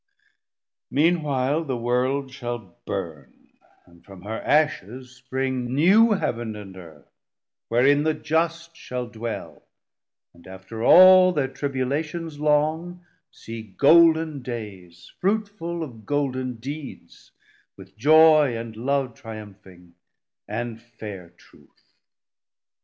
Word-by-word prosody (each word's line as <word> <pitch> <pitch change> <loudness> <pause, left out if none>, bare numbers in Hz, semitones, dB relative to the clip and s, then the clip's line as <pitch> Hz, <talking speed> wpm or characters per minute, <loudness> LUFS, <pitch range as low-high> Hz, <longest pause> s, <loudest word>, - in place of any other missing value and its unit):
Mean 165 +5 +2
while 140 +2 0
The 135 -5 -3
World 130 +3 -1
shall 120 -8 -7
burn, 75 -5 -7 0.4
and 85 -1 -22
from 95 -2 -14
her 110 +2 -5
ashes 130 - -1
spring 130 -1 -3
New 210 +9 +5
Heav'n 120 - -3
and 100 -2 -10
Earth, 80 -6 -14 0.6
wherein 135 +5 +3
the 155 0 0
just 165 +1 -2
shall 125 -5 -5
dwell 115 -1 -7 0.7
And 85 +1 -18
after 95 +4 -8
all 185 +4 +8
thir 145 -5 0
tribulations 145 +4 -3
long 155 +4 0 0.2
See 115 -3 -9
golden 160 - +4
days, 100 -8 -9
fruitful 195 -4 -2
of 115 -7 -10
golden 130 -3 -2
deeds, 135 - -9 0.5
With 95 -1 -15
Joy 155 0 +5
and 115 -1 -7
Love 135 +2 -1
triumphing, 95 -6 -12 0.5
and 115 +1 -5
fair 105 -6 -10
Truth. - - -25
130 Hz, 110 wpm, -24 LUFS, 110-155 Hz, 0.7 s, all